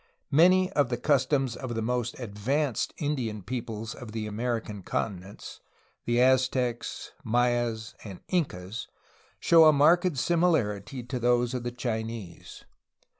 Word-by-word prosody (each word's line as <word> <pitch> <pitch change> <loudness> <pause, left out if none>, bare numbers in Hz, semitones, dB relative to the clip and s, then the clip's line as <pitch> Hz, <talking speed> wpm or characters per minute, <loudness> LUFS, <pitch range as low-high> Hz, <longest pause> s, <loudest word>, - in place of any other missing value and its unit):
Many 185 +5 +5
of 145 -8 +2
the 120 - -1
customs 135 -2 +1
of 125 -3 -5
the 115 - -1
most 120 +1 -2
advanced 125 +5 -1
Indian 125 - -2
peoples 115 -1 -5
of 110 -3 -10
the 110 -1 -3
American 110 -1 -3
continents, 95 0 -5 0.5
the 120 0 +1
Aztecs, 130 -1 +1
Mayas, 120 -1 0
and 100 -4 -9
Incas, 110 - -2 0.5
show 165 -1 +6
a 155 - +8
marked 165 +3 +4
similarity 125 - +1
to 125 +1 -4
those 120 0 +2
of 125 - -2
the 120 0 -4
Chinese. 110 -6 -5
120 Hz, 125 wpm, -28 LUFS, 110-135 Hz, 0.5 s, a